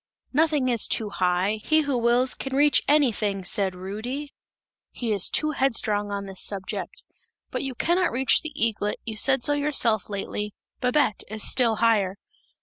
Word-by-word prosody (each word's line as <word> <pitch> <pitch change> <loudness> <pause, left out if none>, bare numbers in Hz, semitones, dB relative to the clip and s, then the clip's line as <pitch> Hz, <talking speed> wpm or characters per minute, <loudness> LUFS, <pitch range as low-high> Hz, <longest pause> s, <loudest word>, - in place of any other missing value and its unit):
'Nothing 300 -2 +2
is 235 -3 +3
too 215 -2 -1
high; 185 +3 0
he 315 0 +3
who 285 -3 -1
wills 240 +2 +2
can 270 -1 -5
reach 290 +1 +4
anything!' 215 -10 +1
said 190 0 0
Rudy. 225 +10 -6 0.6
He 235 -3 -4
is 200 -3 +3
too 305 0 0
headstrong 220 -7 0
on 200 0 -4
this 195 -1 -5
subject! 195 -2 -3 0.5
'But - - -2
you 270 -2 -4
cannot 350 +7 +1
reach 260 +2 +3
the 315 - -4
eaglet, 220 -5 0
you 220 - -4
said 265 +3 +1
so 290 - +2
yourself 275 -8 +1
lately! 210 +1 -4 0.2
Babette 250 -4 +1
is 215 0 -5
still 235 -4 +2
higher!' 210 -4 +2
230 Hz, 160 wpm, -25 LUFS, 205-275 Hz, 0.6 s, reach